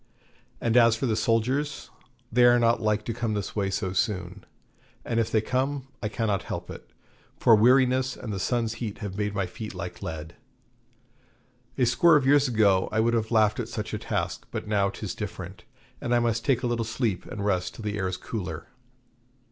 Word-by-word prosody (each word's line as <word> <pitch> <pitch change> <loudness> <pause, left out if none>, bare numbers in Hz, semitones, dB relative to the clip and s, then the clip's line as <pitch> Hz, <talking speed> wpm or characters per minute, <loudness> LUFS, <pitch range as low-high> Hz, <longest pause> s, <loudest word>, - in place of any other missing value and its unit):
And 115 0 0
as 115 -2 +6
for 115 - -2
the 110 -3 +1
soldiers, 125 +6 0 0.4
they 120 +1 +5
are 120 0 +6
not 115 0 +2
like 105 -1 0
to 115 - -2
come 115 -2 -2
this 100 -2 -4
way 100 -2 0
so 95 -1 -2
soon, 90 -2 -2 0.6
and 115 - 0
if 115 - +1
they 110 - +3
come 135 +3 -2
I 105 - -2
cannot 105 -3 -1
help - - -6
it; - - -11 0.5
for 115 - +6
weariness 130 +3 +3
and 110 - -5
the 95 - -3
sun's 115 +2 0
heat 110 -4 -4
have 100 -4 -6
made 105 0 -2
my 100 -1 0
feet 110 +4 -8
like - - -6
lead. 80 0 -6 1.4
A 130 - +3
score 165 +7 +5
of 145 -3 +3
years 140 +1 +5
ago 105 -6 +3
I 110 - 0
would 115 +1 +2
have 110 -1 0
laughed 110 -2 +3
at - - -3
such - - -5
a - - -2
task, - - -3
but - - -5
now 100 -2 +2
'tis - - -5
different, - - -7 0.4
and 120 0 +1
I - - +4
must 115 -1 0
take 130 -3 +1
a - - +1
little 120 -1 0
sleep 110 -4 -2
and 105 -5 -5
rest 95 -3 0
till 115 - -9
the 105 -1 -2
air 95 - 0
is 90 - -3
cooler. 100 -6 -6
110 Hz, 205 wpm, -26 LUFS, 105-120 Hz, 1.4 s, as